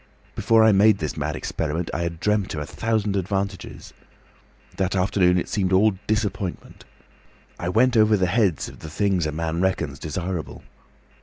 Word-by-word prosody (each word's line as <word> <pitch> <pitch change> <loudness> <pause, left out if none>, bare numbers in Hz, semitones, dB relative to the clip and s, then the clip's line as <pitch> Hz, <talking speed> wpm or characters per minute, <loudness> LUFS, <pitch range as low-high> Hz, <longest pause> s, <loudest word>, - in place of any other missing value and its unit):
Before 115 -1 +3
I 110 - +6
made 105 +1 +5
this 75 -4 -4
mad - - -3
experiment 80 +2 -3
I - - -2
had 85 -1 -3
dreamt 105 -2 0
of - - -3
a - - -4
thousand 110 +2 -1
advantages. 95 0 -4 0.8
That 95 0 0
afternoon 90 -1 +2
it 90 - -1
seemed 95 -3 -1
all 100 +3 +4
disappointment. 105 -4 -3 0.7
I 85 - -2
went 125 +6 +3
over 110 -1 +5
the 95 - +1
heads 90 - +1
of - - -12
the 80 - -8
things 90 -1 0
a - - -2
man 80 +2 -2
reckons 85 -8 -1
desirable. 85 +2 -5
95 Hz, 165 wpm, -23 LUFS, 85-105 Hz, 0.8 s, I